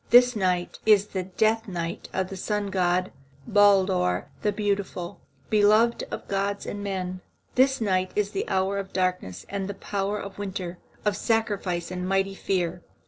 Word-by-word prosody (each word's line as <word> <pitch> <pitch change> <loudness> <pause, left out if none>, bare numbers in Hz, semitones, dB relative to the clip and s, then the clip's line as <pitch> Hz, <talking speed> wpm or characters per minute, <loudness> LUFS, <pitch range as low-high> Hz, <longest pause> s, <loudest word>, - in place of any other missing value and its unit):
This 245 0 +7
night 180 -3 0
is 210 -2 +5
the 190 - -2
death 220 +5 +1
night 170 -3 -4
of 190 -1 -1
the 195 - -6
sun 205 +1 -2
god, 180 0 +1 0.3
Baldur 190 - +3
the 210 - +2
Beautiful, 200 -4 -2 0.3
beloved 215 +2 +4
of - - -6
gods 200 +1 -1
and 205 0 -5
men. 185 -2 -3 0.3
This 265 +1 +4
night 185 -4 +1
is 205 -1 +1
the 195 - -3
hour 190 +1 +1
of 195 -1 -7
darkness 180 - -1
and 200 -1 -3
the 200 - -4
power 200 +1 -2
of 200 0 -8
winter, 185 -3 -4 0.3
of 210 -1 +2
sacrifice 200 -7 0
and 180 0 -3
mighty 195 0 +1
fear. 180 -3 -1
195 Hz, 160 wpm, -26 LUFS, 185-205 Hz, 0.3 s, This